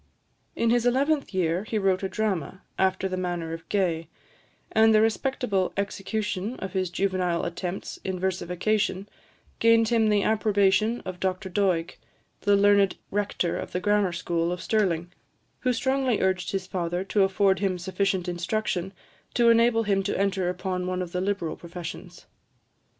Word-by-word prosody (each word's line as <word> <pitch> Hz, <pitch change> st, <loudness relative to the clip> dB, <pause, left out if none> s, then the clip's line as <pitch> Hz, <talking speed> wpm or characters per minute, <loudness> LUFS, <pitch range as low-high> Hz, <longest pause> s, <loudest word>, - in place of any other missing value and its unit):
In 230 Hz, 0 st, +2 dB
his 240 Hz, 0 st, +3 dB
eleventh 280 Hz, +4 st, +1 dB
year, 180 Hz, -1 st, 0 dB
he 220 Hz, 0 st, -3 dB
wrote 195 Hz, -2 st, +2 dB
a 190 Hz, -, -2 dB
drama, 190 Hz, -4 st, -2 dB, 0.2 s
after 190 Hz, 0 st, +2 dB
the 185 Hz, -1 st, -3 dB
manner 175 Hz, -3 st, -3 dB
of 165 Hz, 0 st, -9 dB
Gay; 170 Hz, -5 st, 0 dB, 0.6 s
and 220 Hz, 0 st, +5 dB
the -, -, +6 dB
respectable 220 Hz, -3 st, 0 dB
execution 205 Hz, +2 st, -2 dB
of 190 Hz, -5 st, -6 dB
his 185 Hz, -2 st, 0 dB
juvenile 185 Hz, -2 st, 0 dB
attempts 180 Hz, +2 st, -5 dB
in 190 Hz, -1 st, -3 dB
versification 190 Hz, +2 st, -1 dB, 0.5 s
gained 230 Hz, -1 st, +4 dB
him 225 Hz, -2 st, +3 dB
the 205 Hz, -1 st, +3 dB
approbation 215 Hz, +1 st, +2 dB
of 185 Hz, -1 st, -7 dB
Dr 190 Hz, +1 st, -2 dB
Doig, 180 Hz, -3 st, 0 dB, 0.4 s
the 205 Hz, 0 st, +3 dB
learned 200 Hz, -1 st, +4 dB, 0.2 s
rector 200 Hz, -4 st, -1 dB
of -, -, -7 dB
the 180 Hz, -, 0 dB
grammar 205 Hz, -1 st, +2 dB
school 170 Hz, -1 st, -1 dB
of 180 Hz, -, -3 dB
Stirling, 180 Hz, -5 st, 0 dB, 0.5 s
who 255 Hz, -, +1 dB
strongly 260 Hz, -1 st, +1 dB
urged 185 Hz, -1 st, 0 dB
his 195 Hz, -1 st, -2 dB
father 175 Hz, -1 st, -2 dB
to 200 Hz, +1 st, +1 dB
afford 195 Hz, 0 st, +3 dB
him 190 Hz, -2 st, 0 dB
sufficient 190 Hz, 0 st, -1 dB
instruction, 180 Hz, +1 st, -2 dB, 0.4 s
to 235 Hz, -1 st, +5 dB
enable 230 Hz, 0 st, +4 dB
him 200 Hz, -2 st, +1 dB
to 195 Hz, -, -2 dB
enter 190 Hz, -2 st, +1 dB
upon 180 Hz, 0 st, -3 dB
one 185 Hz, 0 st, -1 dB
of 175 Hz, -, -8 dB
the 180 Hz, -, -2 dB
liberal 190 Hz, -4 st, -1 dB
professions. 170 Hz, -1 st, -9 dB
190 Hz, 155 wpm, -26 LUFS, 180-215 Hz, 0.6 s, the